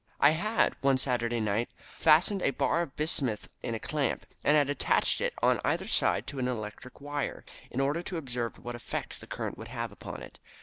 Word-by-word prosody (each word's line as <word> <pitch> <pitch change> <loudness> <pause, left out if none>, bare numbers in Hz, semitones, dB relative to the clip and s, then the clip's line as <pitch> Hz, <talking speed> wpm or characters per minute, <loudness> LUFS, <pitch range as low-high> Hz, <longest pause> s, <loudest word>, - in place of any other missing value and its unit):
"I 140 - +7
had 210 +8 +2
one 135 -1 +4
Saturday 120 -2 +1
night 110 +2 0 0.3
fastened 175 +5 +5
a - - +3
bar 150 +5 +1
of 165 -6 -5
bismuth 140 -8 -1
in 115 - -2
a - - -3
clamp, 145 0 -1 0.2
and 150 +1 +5
had 145 -2 +4
attached 145 - +2
it - - +1
on - - +4
either - - +1
side - - +2
to 140 - -5
an 125 - +1
electric 120 +1 -5
wire, 145 -1 -3 0.2
in 130 - -3
order 145 +5 +1
to 175 0 -4
observe 125 -6 -3
what 120 - -6
effect 120 0 -5
the - - -11
current - - -4
would 110 - -7
have 115 -2 -4
upon 100 - -8
it. - - -12
135 Hz, 205 wpm, -30 LUFS, 120-150 Hz, 0.3 s, I